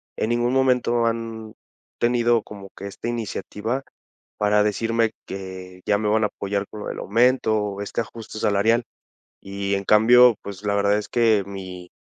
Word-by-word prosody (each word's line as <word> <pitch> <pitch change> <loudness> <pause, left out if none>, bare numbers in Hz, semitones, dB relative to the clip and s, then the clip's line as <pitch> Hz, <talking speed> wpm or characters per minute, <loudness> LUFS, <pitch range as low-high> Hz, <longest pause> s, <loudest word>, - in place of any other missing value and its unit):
en 110 - -1
ningún 120 +1 +1
momento 125 -3 +2
han 115 -1 -3 0.5
tenido 120 -1 +2
como 100 -2 -11
que 100 - -7
esta 100 +3 -7
iniciativa 115 +2 -3 0.5
para 105 0 +3
decirme 115 +2 +1 0.2
que 95 -1 -8
ya 105 - +3
me 105 +1 -2
van 110 +1 +2
a - - +3
apoyar 100 0 -3
con 105 - -9
lo - - -6
del - - -5
aumento, 115 +1 +2
o 100 -1 -3
este 100 +3 -2
ajuste 110 -1 -8
salarial. 110 +3 +2 0.6
Y, 100 0 -3
en 100 0 -2
cambio, 120 +3 +6
pues, 100 -1 -8
la 100 0 0
verdad 100 0 +2
es 105 - -6
que 110 -4 +3
mi 95 -2 -8
105 Hz, 170 wpm, -23 LUFS, 100-115 Hz, 0.6 s, cambio